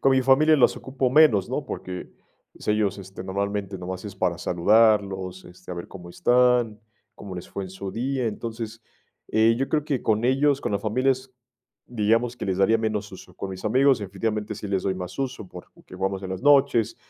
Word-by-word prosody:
con 135 Hz, -, +4 dB
mi 130 Hz, 0 st, +3 dB
familia 150 Hz, +4 st, +5 dB
los 130 Hz, -, +4 dB
ocupo 130 Hz, -1 st, -2 dB
menos, 125 Hz, -10 st, +5 dB
¿no?, 135 Hz, +3 st, -2 dB
porque, 90 Hz, -7 st, -6 dB, 0.4 s
pues, -, -, -11 dB
ellos, 105 Hz, -2 st, +1 dB
este, 95 Hz, -1 st, -9 dB
normalmente, 100 Hz, 0 st, -3 dB
nomás 90 Hz, +1 st, -6 dB
es 100 Hz, -2 st, -7 dB
para 90 Hz, -3 st, 0 dB
saludarlos, 95 Hz, 0 st, +2 dB
este, 90 Hz, +1 st, -13 dB
a 90 Hz, -, -3 dB
ver 85 Hz, -, -7 dB
cómo 90 Hz, -2 st, -11 dB
están, 120 Hz, -1 st, +2 dB, 0.3 s
cómo 95 Hz, -2 st, -9 dB
les 90 Hz, -, -8 dB
fue 100 Hz, -, -5 dB
en 95 Hz, -, -9 dB
su 95 Hz, +1 st, -6 dB
día. 130 Hz, +1 st, -1 dB
Entonces, 115 Hz, +1 st, -5 dB, 0.5 s
eh, 110 Hz, +1 st, +4 dB
yo 135 Hz, -, -1 dB
creo 150 Hz, -2 st, 0 dB
que 140 Hz, -4 st, -2 dB
con 110 Hz, +1 st, +1 dB
ellos 140 Hz, +2 st, +2 dB
con -, -, -3 dB
la 100 Hz, -, +1 dB
familia 130 Hz, +6 st, +1 dB
es, 130 Hz, 0 st, -9 dB, 0.5 s
digamos, 115 Hz, +1 st, +1 dB
que -, -, -5 dB
les 95 Hz, -1 st, -1 dB
daría 110 Hz, +4 st, +4 dB
menos 110 Hz, -2 st, -2 dB
uso, 90 Hz, -1 st, -12 dB
con 95 Hz, -, -6 dB
mis 95 Hz, 0 st, -8 dB
amigos, 130 Hz, +4 st, +4 dB
definitivamente, 105 Hz, +2 st, -3 dB
sí 105 Hz, -, -7 dB
les 95 Hz, -2 st, 0 dB
doy 95 Hz, -, 0 dB
más 90 Hz, -1 st, -7 dB
uso, 130 Hz, -6 st, -3 dB
porque 90 Hz, -, -13 dB
que -, -, -12 dB
jugamos 95 Hz, +1 st, -2 dB
en 95 Hz, -, -6 dB
las 95 Hz, +3 st, -5 dB
noches. 130 Hz, -6 st, +4 dB
105 Hz, 205 wpm, -24 LUFS, 95-125 Hz, 0.5 s, familia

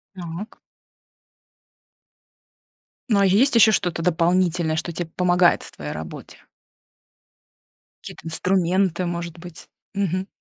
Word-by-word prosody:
Так. 175 Hz, +4 st, -8 dB, 2.5 s
Ну, 205 Hz, -, +3 dB
а 195 Hz, -, +4 dB
есть 235 Hz, +9 st, +4 dB
еще 225 Hz, -1 st, +7 dB
что-то 175 Hz, -4 st, 0 dB
дополнительное, 175 Hz, -1 st, +1 dB
что 170 Hz, +1 st, -3 dB
тебе 170 Hz, 0 st, -4 dB
помогает 180 Hz, -1 st, +3 dB
в -, -, -10 dB
твоей 75 Hz, 0 st, -7 dB
работе? 80 Hz, 0 st, -9 dB, 1.7 s
Какие-то 165 Hz, -, -11 dB
инструменты, 180 Hz, +1 st, +1 dB
может 170 Hz, -1 st, -5 dB
быть? 175 Hz, -1 st, -11 dB, 0.3 s
Мгм. 190 Hz, -1 st, -1 dB
175 Hz, 105 wpm, -22 LUFS, 165-185 Hz, 2.5 s, еще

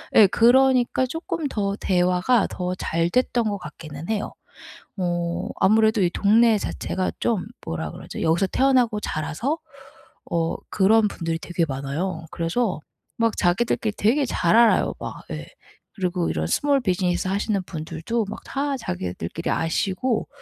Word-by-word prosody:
예 210 Hz, -, +9 dB
그러니까 255 Hz, +3 st, +4 dB
쪼끔 325 Hz, +2 st, -3 dB
더 200 Hz, -6 st, -1 dB
대화가 180 Hz, +5 st, +2 dB
더 180 Hz, 0 st, -3 dB
잘 165 Hz, -1 st, -1 dB
됐던 245 Hz, +2 st, +1 dB
것 205 Hz, -, -2 dB
같기는 155 Hz, -1 st, -9 dB
해요. 215 Hz, -2 st, -2 dB, 0.6 s
어 175 Hz, +1 st, -2 dB
아무래도 220 Hz, +1 st, +4 dB
이 180 Hz, -, +3 dB
동네 220 Hz, +4 st, +4 dB
자체가 190 Hz, -2 st, -2 dB
좀 225 Hz, -6 st, 0 dB, 0.2 s
뭐라 80 Hz, -2 st, -4 dB
그러죠? -, -, -8 dB
여기서 170 Hz, +4 st, +2 dB
태어나고 245 Hz, -2 st, +2 dB
자라서 160 Hz, -, -2 dB, 0.7 s
어 165 Hz, -1 st, 0 dB
그런 215 Hz, +2 st, +4 dB
분들이 165 Hz, -3 st, -3 dB
되게 170 Hz, 0 st, -1 dB
많아요. 150 Hz, +5 st, -3 dB
그래서 180 Hz, +3 st, -1 dB, 0.4 s
막 230 Hz, -1 st, +1 dB
자기들끼리 210 Hz, +3 st, +1 dB
되게 265 Hz, +7 st, +2 dB
잘 175 Hz, -6 st, +1 dB
알아요 235 Hz, 0 st, +4 dB
막 -, -, -7 dB
예. -, -, -5 dB, 0.5 s
그리고 180 Hz, -2 st, -1 dB
이런 80 Hz, 0 st, -1 dB
스몰 280 Hz, -, +2 dB
비즈니스 180 Hz, -3 st, 0 dB
하시는 200 Hz, +1 st, 0 dB
분들도 165 Hz, +7 st, -3 dB
막 -, -, -6 dB
다 280 Hz, 0 st, -2 dB
자기들끼리 90 Hz, -, -4 dB
아시고 190 Hz, +8 st, 0 dB
195 Hz, 305 characters per minute, -23 LUFS, 170-230 Hz, 0.7 s, 예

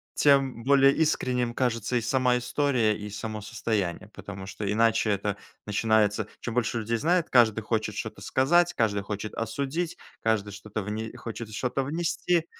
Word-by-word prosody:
тем 135 Hz, -4 st, +3 dB
более 135 Hz, +1 st, +6 dB
искренним 125 Hz, -6 st, +1 dB
кажется 120 Hz, -1 st, 0 dB
и 120 Hz, -, +2 dB
сама 125 Hz, +2 st, +2 dB
история, 125 Hz, -3 st, +1 dB
и 105 Hz, 0 st, -7 dB
само 105 Hz, +1 st, -5 dB
состояние. 105 Hz, -2 st, -2 dB
Потому 95 Hz, -1 st, -8 dB
что 100 Hz, +1 st, -5 dB
иначе 110 Hz, 0 st, +3 dB
это 100 Hz, 0 st, -1 dB, 0.3 s
начинается: 105 Hz, 0 st, +2 dB
чем 120 Hz, -, -4 dB
больше 120 Hz, -1 st, 0 dB
людей 115 Hz, +1 st, -1 dB
знает, 170 Hz, +6 st, +1 dB
каждый 115 Hz, -3 st, +5 dB
хочет 110 Hz, 0 st, -1 dB
что-то -, -, -5 dB
сказать, 175 Hz, +6 st, +3 dB
каждый 105 Hz, -3 st, +1 dB
хочет 105 Hz, +1 st, -5 dB
осудить, 140 Hz, +9 st, -3 dB, 0.2 s
каждый 110 Hz, -2 st, 0 dB
что-то 105 Hz, +2 st, -5 dB
вне 110 Hz, +2 st, -4 dB
хочет 115 Hz, -1 st, -7 dB
что-то 125 Hz, +4 st, -1 dB
внести, 165 Hz, +3 st, 0 dB
115 Hz, 150 wpm, -27 LUFS, 105-130 Hz, 0.3 s, более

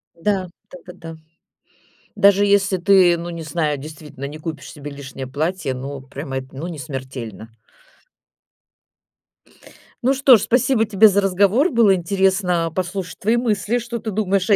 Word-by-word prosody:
Да. 190 Hz, +1 st, -1 dB, 0.2 s
Да-да-да. 175 Hz, -2 st, -11 dB, 1.0 s
Даже 200 Hz, 0 st, +5 dB
если 200 Hz, -1 st, +2 dB
ты, 180 Hz, -1 st, +5 dB
ну 170 Hz, +1 st, -6 dB
не 170 Hz, -1 st, -6 dB
знаю, 155 Hz, -1 st, -1 dB
действительно, 150 Hz, -1 st, -10 dB
не 145 Hz, +2 st, -6 dB
купишь 155 Hz, -3 st, -7 dB
себе 145 Hz, 0 st, -8 dB
лишнее 135 Hz, -2 st, -8 dB
платье, 155 Hz, +2 st, -2 dB
ну 135 Hz, +2 st, -6 dB
прям 135 Hz, +1 st, -8 dB
это, 130 Hz, 0 st, -4 dB
ну 155 Hz, +5 st, -5 dB
не 165 Hz, -3 st, -7 dB
смертельно. 130 Hz, -5 st, -7 dB, 2.6 s
Ну 260 Hz, +3 st, +3 dB
что 265 Hz, -2 st, +7 dB
ж, 210 Hz, -, +1 dB
спасибо 235 Hz, +1 st, +2 dB
тебе 215 Hz, 0 st, +5 dB
за 200 Hz, -1 st, +2 dB
разговор, 200 Hz, -, +3 dB
было 230 Hz, -5 st, +4 dB
интересно 185 Hz, -2 st, +1 dB
послушать 185 Hz, 0 st, -4 dB
твои 225 Hz, +4 st, +1 dB
мысли, 220 Hz, -1 st, 0 dB
что 235 Hz, 0 st, -5 dB
ты 220 Hz, -, -5 dB
думаешь 195 Hz, -1 st, 0 dB
о 205 Hz, -, +6 dB
180 Hz, 150 wpm, -20 LUFS, 150-200 Hz, 2.6 s, что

